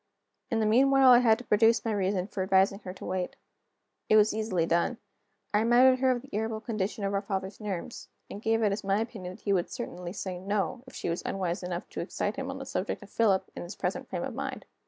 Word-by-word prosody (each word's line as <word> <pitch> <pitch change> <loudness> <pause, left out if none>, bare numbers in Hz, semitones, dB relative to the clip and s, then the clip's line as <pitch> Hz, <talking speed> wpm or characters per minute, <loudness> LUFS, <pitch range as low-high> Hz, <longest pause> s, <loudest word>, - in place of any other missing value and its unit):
In 230 -4 0
the 220 - +2
meanwhile, 265 +4 +6
I 240 - +8
had 225 -3 +4
to 250 - -9
produce 225 +1 +3
my 225 - 0
reason 195 -2 0
for 195 -1 -5
advising 190 +1 +3
her 185 - -7
to - - -10
wait. 185 -1 -3 0.7
It - - +6
was 215 0 +5
easily 215 -6 0
done. 170 +8 +1 0.6
I 210 - +4
reminded 250 +3 +5
her 260 0 +3
of 250 -1 0
the 275 - -14
irritable 220 +1 -2
condition 215 -3 -3
of 200 0 -1
our 195 - +1
father's 195 -1 -4
nerves, 210 +1 -5 0.2
and 205 - -8
gave 225 0 +1
it 210 - +3
as 200 - -3
my 195 +1 +1
opinion 210 -6 -5
that - - -19
he 200 - +1
would 180 -2 0
certainly 180 -8 -6
say 185 -2 -5
No, 200 +4 -2
if 260 - -13
she - - -4
was 170 0 -1
unwise 180 -3 -2
enough 180 -1 -4
to - - -7
excite 205 +3 -3
him 270 0 -3
on 270 - -5
the 270 - -7
subject 205 -4 -3
of 205 - -15
Philip, 205 -5 +2
in - - -6
his 175 +3 -7
present - - -3
frame - - -3
of - - -4
mind. - - -5
210 Hz, 240 wpm, -29 LUFS, 190-230 Hz, 0.7 s, I